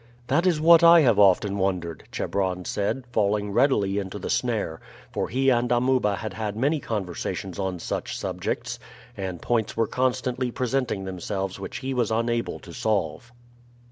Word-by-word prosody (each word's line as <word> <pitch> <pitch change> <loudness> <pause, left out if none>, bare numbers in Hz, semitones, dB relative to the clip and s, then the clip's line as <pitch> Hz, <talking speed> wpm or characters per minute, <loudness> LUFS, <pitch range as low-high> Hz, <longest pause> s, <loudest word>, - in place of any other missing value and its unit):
"That 165 +7 +3
is 170 -4 +2
what 165 +2 +7
I 170 0 +9
have 120 -8 +4
often 100 0 +4
wondered," 90 -4 -2
Chebron 95 -2 -2
said, 105 +6 -2
falling 105 -2 +1
readily 100 -5 +2
into 95 0 -5
the 100 - -4
snare, 110 -10 -1 0.3
for - - -2
he 135 +2 +2
and 120 0 +1
Amuba 120 -4 +2
had 110 -1 -5
had 105 +1 -3
many 145 +6 +1
conversations 95 -4 -4
on 95 -2 -2
such - - -4
subjects, - - -3 0.4
and 95 -3 -5
points 115 -3 0
were 115 - +3
constantly 125 +1 -1
presenting 125 -4 -1
themselves 95 +1 -4
which - - -6
he 135 - -1
was 120 -4 +1
unable 115 +1 -1
to - - -11
solve. 105 +2 -1
110 Hz, 160 wpm, -25 LUFS, 95-125 Hz, 0.4 s, I